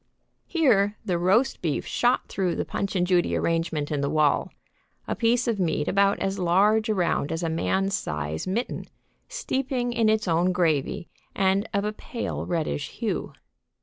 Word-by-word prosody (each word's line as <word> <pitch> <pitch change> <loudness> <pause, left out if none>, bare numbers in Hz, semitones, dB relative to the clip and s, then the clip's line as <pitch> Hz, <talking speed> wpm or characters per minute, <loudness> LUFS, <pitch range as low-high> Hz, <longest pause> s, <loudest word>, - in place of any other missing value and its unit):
Here 210 - +2
the 175 -2 0
roast 215 +10 +2
beef 160 -5 -1
shot 245 +1 +1
through 185 -3 -1
the - - -2
Punch 195 0 -3
and 180 -1 +2
Judy 180 -1 +2
arrangement 165 -3 -1
in 145 -2 0
the 140 - 0
wall, 155 -2 +2 0.6
a - - -1
piece 240 +1 +2
of 225 -4 0
meat 160 -4 0
about 200 +1 +3
as 195 0 -2
large 205 +5 +3
around 180 -8 0
as 165 +1 -2
a 165 - 0
man's 190 +4 0
size 75 - -3
mitten, 225 +7 -2 0.4
steeping 265 - -2
in 230 -2 +2
its 215 -2 +1
own 175 +2 +2
gravy 165 -2 0 0.3
and 195 +2 +1
of 200 0 0
a 210 - -2
pale 230 +2 -5
reddish 155 - -2
hue. - - -3
190 Hz, 165 wpm, -25 LUFS, 165-215 Hz, 0.6 s, about